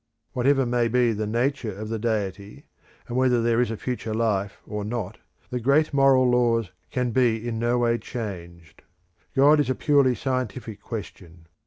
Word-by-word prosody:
Whatever 135 +2 +2
may 120 -1 +1
be 120 0 +2
the 105 0 -3
nature 120 +1 -1
of 110 +1 -6
the 115 0 -3
Deity, 105 -3 -3 0.4
and 120 - -5
whether 125 -1 +3
there 115 0 +2
is 125 - 0
a 115 - -4
future 115 -3 -4
life 100 -3 -1
or 105 -1 -4
not, 110 -2 -4 0.3
the 125 - -1
great 140 +6 +2
moral 135 -2 +5
laws 115 -5 +2 0.2
can 125 -1 -1
be 120 -2 +1
in 115 -1 -3
no 120 +1 +1
way 120 -1 +1
changed. 85 -8 -8 0.5
God 145 +3 +6
is 145 - +1
a 130 - +1
purely 140 -4 +3
scientific 125 -3 -4
question. 90 -7 -8
120 Hz, 170 wpm, -25 LUFS, 110-125 Hz, 0.5 s, God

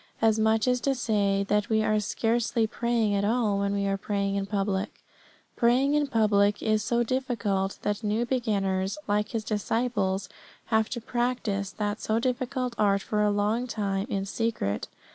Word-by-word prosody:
As 220 -1 +3
much 220 +1 +2
as 250 -1 +2
to 275 -1 +1
say 200 -5 +1
that 210 0 +1
we 220 -1 +2
are 215 0 +2
scarcely 225 +2 0
praying 230 -1 0
at 200 0 +1
all 215 -2 +1
when 200 0 0
we 200 0 0
are 195 0 0
praying 200 -1 -1
in 200 0 -1
public. 200 0 -1 0.7
Praying 255 +4 +3
in 295 -1 +2
public 205 -4 +2
is 215 -1 +2
so 235 +2 +1
difficult 230 -6 -1
that 205 +2 -1
new 215 +3 0
beginners, 200 -5 0
like 210 0 +1
His 225 -2 -3
disciples, 210 -2 -1 0.5
have 220 0 +3
to 240 - -4
practise 235 -5 -1
that 210 0 -3
so 220 - 0
difficult 255 +1 -1
art 200 -2 +3
for 210 -1 -1
a 210 - +3
long 210 +4 0
time 200 -3 -2
in 195 -3 -1
secret. 205 - -2
215 Hz, 170 wpm, -27 LUFS, 200-235 Hz, 0.7 s, As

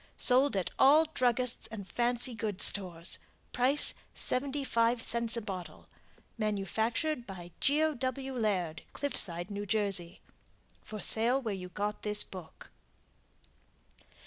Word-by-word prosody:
Sold 260 -2 +3
at 185 - -2
all 300 +4 +7
druggists 250 -2 0
and 210 -4 -8
fancy 240 +2 +1
goods 215 -4 -2
stores. 175 -4 -1 0.3
Price 260 +4 +5 0.2
75c 235 -4 0
a - - -2
bottle. 190 -4 -7 0.5
Manufactured 220 - -1
by 175 -3 -9
GEO. 310 +2 +3
W. 265 +1 -3
LAIRD, 190 -9 -1
CLIFFSIDE. 180 -10 -1
N. 205 0 -4
J. 195 -4 +1 0.6
For 215 -2 -8
sale 235 +7 +3
where 225 -6 -3
you 180 -1 -6
got 210 +2 -3
this 210 0 +1
book. 185 -4 -12
225 Hz, 115 wpm, -31 LUFS, 195-255 Hz, 0.6 s, all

